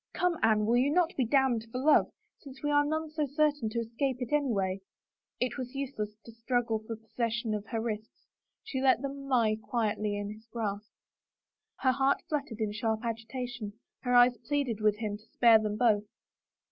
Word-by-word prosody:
" - - -49
Come, 360 -2 0
Anne, 215 -1 +3
will 235 +3 +3
you 260 +3 +3
not 340 +2 +2
be 260 - +1
damned 245 -3 +2
for 250 - -4
love, 290 +4 +4 0.3
since 270 -1 -13
we 295 - +1
are 290 0 +5
none 315 +1 -2
so 305 -1 -1
certain 290 -4 +1
to 225 - -5
escape 250 +3 -2
it 250 +1 -4
any 285 -3 +2
way?" 190 -2 -1 0.6
It 250 +2 -1
was 255 +1 -6
useless 230 -7 -4
to 230 - -10
struggle 230 -1 -1
for 220 +1 -6
possession 225 0 -2
of 210 0 -4
her 230 - -2
wrists; 220 -1 -5 0.4
she 265 -12 -3
let 265 -1 +4
them 275 0 -5 0.2
He 215 0 +1
quietly 210 -2 -1
in 205 0 -4
his 220 +1 -17
grasp. 215 -2 -4 0.9
Her 260 - +4
heart 270 +2 +1
fluttered 280 -7 -3
in 215 -1 0
sharp 220 0 -1
agitation, 230 -1 -4 0.3
her 245 -1 0
eyes 245 0 +6
pleaded 275 -7 -1
with 210 -1 +3
him 210 -2 -3
to 215 - -22
spare 230 -2 +7
them 210 -1 -2
both. 215 -3 +3
235 Hz, 195 wpm, -30 LUFS, 215-275 Hz, 0.9 s, spare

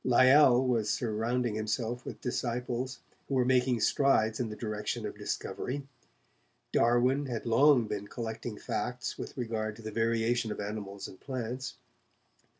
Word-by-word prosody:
Lyell 130 +1 +6
was 115 -4 +1
surrounding 115 +1 0
himself 110 +3 -2
with - - -7
disciples, 125 +1 -2 0.3
who 135 - -1
were 125 -1 +3
making 125 -2 +3
strides 110 -5 +3
in 120 -3 -1
the 105 - -6
direction 105 -2 -3
of - - -5
discovery. 140 +3 -4 0.9
Darwin 125 +4 +3
had 120 -3 -4
long 125 +1 +5
been 100 -1 -4
collecting 115 -1 -5
facts 125 0 -3
with - - -7
regard 110 -3 -2
to 115 - -13
the 110 - -5
variation 115 +1 +1
of - - -5
animals 100 -1 -5
and 95 - -13
plants. 130 -1 -4
120 Hz, 145 wpm, -30 LUFS, 110-125 Hz, 0.9 s, Lyell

